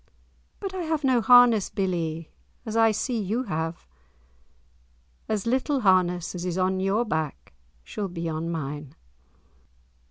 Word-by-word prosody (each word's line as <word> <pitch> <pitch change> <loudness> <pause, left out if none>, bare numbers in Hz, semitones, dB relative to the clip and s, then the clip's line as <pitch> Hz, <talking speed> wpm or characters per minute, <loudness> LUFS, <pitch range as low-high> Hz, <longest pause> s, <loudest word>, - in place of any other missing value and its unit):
"But 390 -2 -5
I 375 - -3
have 315 -3 -2
no 255 -3 +3
harness, 240 -3 +6
billie, 165 -4 -2 0.3
as 220 -1 -5
I 225 0 +5
see 220 +2 -1
you 215 +6 -1
have." 165 - -4 1.4
"As 215 -3 -1
little 265 +3 0
harness 180 -3 +2
as 175 -1 -5
is 180 -1 -2
on 185 0 +1
your 195 +5 +1
back 155 - -4 0.3
shall 200 - -4
be 170 -2 -5
on 160 +1 -3
mine." 145 -3 -5
190 Hz, 135 wpm, -26 LUFS, 165-235 Hz, 1.4 s, harness